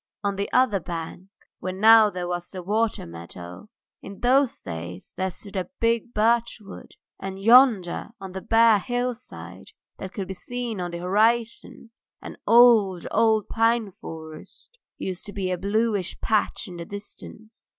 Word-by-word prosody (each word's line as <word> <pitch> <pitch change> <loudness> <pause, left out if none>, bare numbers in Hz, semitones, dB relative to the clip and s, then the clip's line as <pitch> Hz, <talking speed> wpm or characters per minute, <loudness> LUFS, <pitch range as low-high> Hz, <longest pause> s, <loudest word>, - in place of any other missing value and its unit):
On 200 -1 0
the 200 +1 -3
other 250 -6 +3
bank, 170 +1 -7 0.3
where 185 - -4
now 220 +3 +6
there 180 -2 -5
was 175 0 -4
the 185 -2 -7
water 215 +4 0
meadow, 85 - -10 0.3
in 195 0 -11
those 260 +1 +3
days 85 +1 -7
there 190 +1 -1
stood 200 +3 -9
a 185 -2 -3
big 230 0 0
birchwood, 225 -2 -1 0.3
and 190 0 -6
yonder 225 -5 +4
on 190 -1 -8
the 190 +1 -6
bare 225 -1 +5
hillside 245 +3 -5 0.3
that 190 - -6
could 195 -3 -5
be 190 - -5
seen 235 0 -5
on 175 - -3
the 170 - -6
horizon 225 +5 0 0.3
an - - -10
old, 225 -7 +5
old 220 -1 +2
pine 225 -2 +1
forest 160 - -11 0.2
used 185 -1 -5
to 205 - -8
be 190 -2 -2
a 180 - -1
bluish 205 -1 -1
patch 215 +1 0
in 180 -2 -9
the 170 - -6
distance. 210 +2 -10
200 Hz, 155 wpm, -24 LUFS, 180-230 Hz, 0.3 s, now